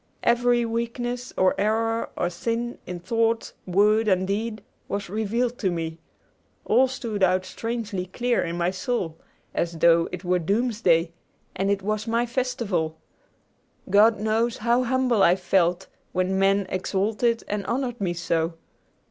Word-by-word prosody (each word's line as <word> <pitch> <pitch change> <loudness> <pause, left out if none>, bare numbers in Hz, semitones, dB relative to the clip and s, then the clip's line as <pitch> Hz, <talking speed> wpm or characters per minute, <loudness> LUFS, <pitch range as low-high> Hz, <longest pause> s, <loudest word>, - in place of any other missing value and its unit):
Every 240 0 +3
weakness 240 +2 -3
or 185 0 +4
error 225 +2 0
or 175 - 0
sin, 230 +6 -3
in 180 -1 -5
thought, 225 +4 0
word, 210 +4 +3
and 190 -2 +3
deed, 215 +2 -3 0.2
was 200 -2 -4
revealed 230 +3 -1
to 195 - +1
me. 165 -1 -4 0.7
All 260 +1 +4
stood 235 -5 -4
out 185 0 +3
strangely 225 -3 -4
clear 240 +5 0
in 170 0 -3
my 175 +1 +1
soul, 190 - -3 0.3
as 170 0 -1
though 165 0 +4
it 180 - -6
were 180 0 +1
doomsday 195 -3 +1 0.4
and 195 +1 0
it 200 -1 0
was 215 +2 -2
my 230 +1 +1
festival. 225 -10 -1 0.9
God 215 +2 +5
knows 225 +2 0
how 235 +3 +2
humble 255 -3 +2
I 175 -1 +6
felt 180 -1 +1 0.3
when 185 +1 0
men 195 0 +3
exalted 210 +5 0
and 205 -1 -2
honored 245 -2 -2
me 175 -3 -1
so. 165 -1 -1
210 Hz, 145 wpm, -25 LUFS, 185-235 Hz, 0.9 s, I